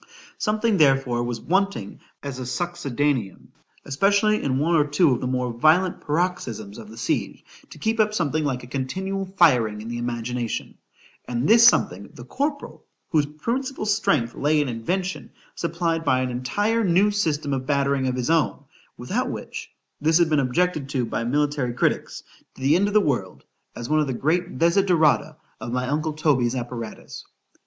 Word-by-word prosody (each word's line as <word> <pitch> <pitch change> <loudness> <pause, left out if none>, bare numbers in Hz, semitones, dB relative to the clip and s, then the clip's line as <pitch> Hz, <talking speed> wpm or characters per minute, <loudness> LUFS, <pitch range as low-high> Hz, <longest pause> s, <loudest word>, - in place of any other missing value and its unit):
SOMETHING 215 0 +1
therefore 135 -5 +3
was 120 -1 -3
wanting 190 - -1 0.2
as 140 -2 -5
a - - -5
succedaneum, 140 - -2 0.4
especially 200 +9 +2
in 130 -2 0
one 160 +5 +1
or 155 -3 +5
two 150 +1 +3
of 125 - 0
the 125 - -2
more 125 -1 -1
violent 160 +9 +3
paroxysms 140 - -2
of 110 -2 -11
the 110 - -12
siege, 115 - -2 0.2
to - - -12
keep 225 +1 -1
up 215 -1 +3
something 155 -6 0
like 130 -4 -2
a - - -8
continual 190 +10 -3
firing 120 -11 +4
in 110 +2 -7
the 120 0 -4
imagination,——and 120 +1 -5
this 230 +3 +8
something, 100 - +2
the 120 - -10
corporal, 285 - -4 0.3
whose 150 -3 +2
principal 235 - -3
strength 150 - +1
lay 150 +1 +1
in 145 - +1
invention, 180 +11 -3 0.2
supplied 170 -1 -2
by 130 -4 +2
an 130 -1 -2
entire 205 - 0
new 195 +2 +3
system 155 -8 -1
of 130 -1 -3
battering 140 -2 +1
of 130 - -1
his 125 +4 -1
own,—without 165 -3 -2
which, - - -7 0.3
this 160 +2 +4
had 170 -2 +2
been 150 - +4
objected 140 +2 0
to 130 -3 -1
by 115 - -3
military 145 0 0
critics, - - -1 0.3
to - - -14
the 140 +4 +4
end 195 +3 +3
of 205 - -3
the - - +8
world, 120 - -2 0.3
as 120 - -6
one 155 +1 +2
of 150 - +1
the 130 - -2
great 175 +8 -1
desiderata 165 -3 +3 0.2
of 120 - -6
my 125 +1 -1
uncle 155 +3 -1
Toby's 135 -6 +1
apparatus. 120 -2 -6
145 Hz, 170 wpm, -23 LUFS, 125-180 Hz, 0.4 s, this